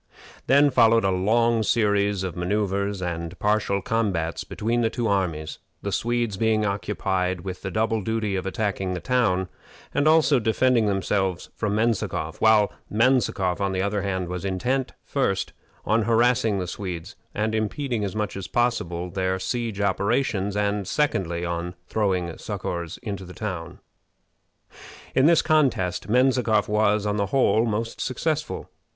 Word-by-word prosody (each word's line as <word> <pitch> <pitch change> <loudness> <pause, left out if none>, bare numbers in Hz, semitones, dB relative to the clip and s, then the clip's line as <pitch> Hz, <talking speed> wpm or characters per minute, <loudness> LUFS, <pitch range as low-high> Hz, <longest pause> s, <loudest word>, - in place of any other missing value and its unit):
Then 140 +1 +5
followed 115 -2 +5
a 95 - +2
long 115 +5 +2
series 100 -3 +1
of 95 -3 -4
manoeuvres 100 +1 -1
and 85 0 -4
partial 105 -2 +1
combats 95 -8 -1
between 115 +3 -1
the 115 - +2
two 120 0 -2
armies, 85 -7 -1 0.2
the 100 - -2
Swedes 120 -2 -1
being 110 0 +2
occupied 95 -2 -1
with 95 0 -6
the 95 - -4
double 110 +3 0
duty 110 -1 -1
of 95 0 -3
attacking 95 -2 -2
the - - -3
town, 100 -8 +1 0.5
and 145 - +2
also 155 -2 +5
of 120 - -2
defending 115 0 +3
themselves 95 -2 -1
from 105 -2 -1
Menzikoff; 110 -8 -1
while 110 -2 +5 0.2
Menzikoff, 105 -6 +2
on 100 -1 0
the 95 0 0
other 100 0 -1
hand, 95 -2 -2
was 90 +1 -5
intent, 125 +8 -1
first 100 -9 -1 0.3
on 110 +2 +2
harassing 115 -1 +2
the 90 - -2
Swedes 90 +1 -6 0.2
and 110 +1 0
impeding 110 +2 -1
as 100 0 -3
much 105 -1 -2
as 95 -1 -5
possible 90 -8 -1
their 95 +1 -1
siege 110 +3 -3
operations, 100 0 0
and, 100 -1 0
secondly, 90 - 0
on 85 +1 -3
throwing 90 -4 -1
succors 85 -1 -4
into 100 -4 -4
the 90 0 -11
town. 85 -5 -5 1.4
In 130 +3 +4
this 170 -1 +5
contest 125 - +1
Menzikoff 125 -3 +3
was, 105 0 +2
on 105 0 0
the 100 -1 0
whole, 115 -1 +3
most 115 +1 -3
successful. 155 +4 -2
105 Hz, 150 wpm, -24 LUFS, 95-115 Hz, 1.4 s, Then